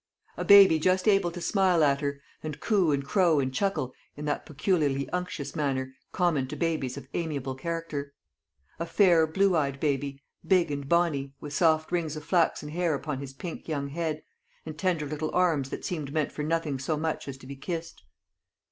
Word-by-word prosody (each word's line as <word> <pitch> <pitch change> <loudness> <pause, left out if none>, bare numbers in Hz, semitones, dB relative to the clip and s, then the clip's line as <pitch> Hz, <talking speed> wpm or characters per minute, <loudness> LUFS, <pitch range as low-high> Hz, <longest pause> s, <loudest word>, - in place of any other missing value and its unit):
A - - -3
baby 195 -5 +8
just 185 +5 +2
able 195 -4 +4
to 175 +1 -7
smile 185 -2 +3
at 140 -1 +3
her, 140 -1 -2 0.2
and 150 -2 -6
coo 195 -7 +2
and 140 -1 0
crow 170 -3 +3
and 130 -1 -1
chuckle 195 -7 -1 0.2
in 150 - -5
that 145 - -2
peculiarly 145 -3 0
unctuous 180 -6 -4
manner 135 -4 -1 0.2
common 160 -7 +1
to - - -6
babies 155 -6 -1
of 135 -2 -9
amiable 145 -6 -2
character; 145 -1 -4 0.7
a 170 - -3
fair 170 -3 +4
blue 190 +3 +2
eyed 140 -3 0
baby, 140 -1 -1 0.2
big 180 -5 +3
and 140 -1 -4
bonny, 150 -6 +1
with 145 -1 -7
soft 160 -1 +2
rings 165 -3 -1
of 155 -1 -8
flaxen 165 -3 +1
hair 165 0 0
upon 140 -1 -4
his 135 -1 -7
pink 165 +4 -7
young 140 -3 -2
head, 155 0 -3 0.4
and 155 -1 -7
tender 175 -4 0
little 155 +1 -3
arms 165 -7 +2
that - - -6
seemed 155 -6 -3
meant 155 -1 0
for - - -5
nothing 155 -3 -1
so 150 +4 -1
much 160 -1 -2
as 135 -1 -6
to 135 - -15
be 140 +1 -7
kissed. 165 +4 -5
155 Hz, 190 wpm, -28 LUFS, 140-170 Hz, 0.7 s, baby